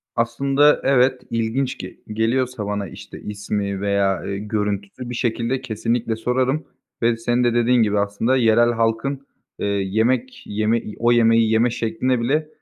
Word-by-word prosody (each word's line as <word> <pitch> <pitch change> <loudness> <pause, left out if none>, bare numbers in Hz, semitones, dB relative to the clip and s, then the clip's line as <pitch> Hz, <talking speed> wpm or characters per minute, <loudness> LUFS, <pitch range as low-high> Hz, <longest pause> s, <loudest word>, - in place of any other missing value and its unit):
Aslında 135 +5 +3
evet, 130 -1 +3
ilginç 115 +3 -1
ge - - -8
geliyorsa 115 +1 -1
bana, 100 -1 -3
işte, - - -11
ismi 100 -1 -3
veya, 100 -2 +1
ııı, 100 - -4
görüntüsü 105 +3 -3
bir 120 - -4
şekilde 120 +2 -1
kesinlikle 115 -1 -1
sorarım 130 +6 0 0.4
ve 115 0 +2
senin 120 +2 0
de 120 -1 +2
dediğin 120 0 +3
gibi 105 -1 +1
aslında 105 +6 +1
yerel 120 0 +4
halkın, 115 +4 -1 0.4
ııı, 100 - 0
yemek 110 +6 0
yeme, 110 +2 0
i 105 - -9
o 120 +1 +3
yemeği 115 -1 +4
yeme 115 +2 +3
şekline 120 +2 -1
bile 150 +6 0
115 Hz, 150 wpm, -21 LUFS, 105-125 Hz, 0.4 s, yerel